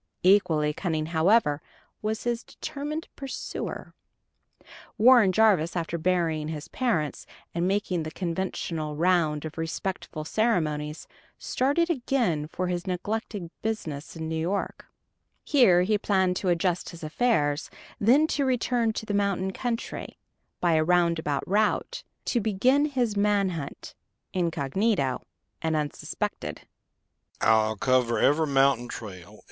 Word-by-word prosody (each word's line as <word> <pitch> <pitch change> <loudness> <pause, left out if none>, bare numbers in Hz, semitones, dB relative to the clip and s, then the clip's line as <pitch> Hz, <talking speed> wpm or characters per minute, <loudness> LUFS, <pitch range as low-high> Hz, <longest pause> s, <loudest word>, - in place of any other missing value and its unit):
Equally 165 -6 +4
cunning, 160 -2 -2
however, 160 -1 +3 0.4
was 215 0 -2
his 240 0 -1
determined 305 +2 -5
pursuer. 275 -2 -6 1.0
Warren 235 -4 +7
Jarvis, 185 -6 +3
after 170 -1 -2
burying 165 -3 0
his 155 -2 -5
parents, 175 - -1 0.3
and 170 +1 0
making 190 -3 0
the 155 - -4
conventional 165 -3 -3
round 160 -3 +2
of 155 +1 -7
respectful 165 -1 -4
ceremonies, 155 -8 0 0.3
started 290 +7 +1
again 240 - 0
for 185 +3 -3
his 180 +1 -3
neglected 190 -1 -3
business 165 -11 -4
in 160 -1 -5
New 160 0 -2
York. 190 +5 -3 0.6
Here 195 -11 +5
he 210 +2 +1
planned 190 -3 +2
to 185 - -1
adjust 175 +1 0
his 170 -2 -11
affairs, 155 -4 +1 0.3
then 255 +9 +5
to 290 -2 0
return 245 -3 +1
to 220 - -5
the 205 - -3
mountain 200 -2 0
country, 235 +1 -4 0.4
by 175 -2 +2
a 155 0 +3
roundabout 170 -4 +1
route, 210 +3 0 0.2
to 240 - +1
begin 245 +8 +3
his 250 -7 0
man 200 -1 +2
hunt, 160 -6 -6 0.4
incognito 165 - 0 0.4
and 160 -1 0
unsuspected. 150 -2 -3
185 Hz, 115 wpm, -27 LUFS, 160-220 Hz, 1.0 s, Warren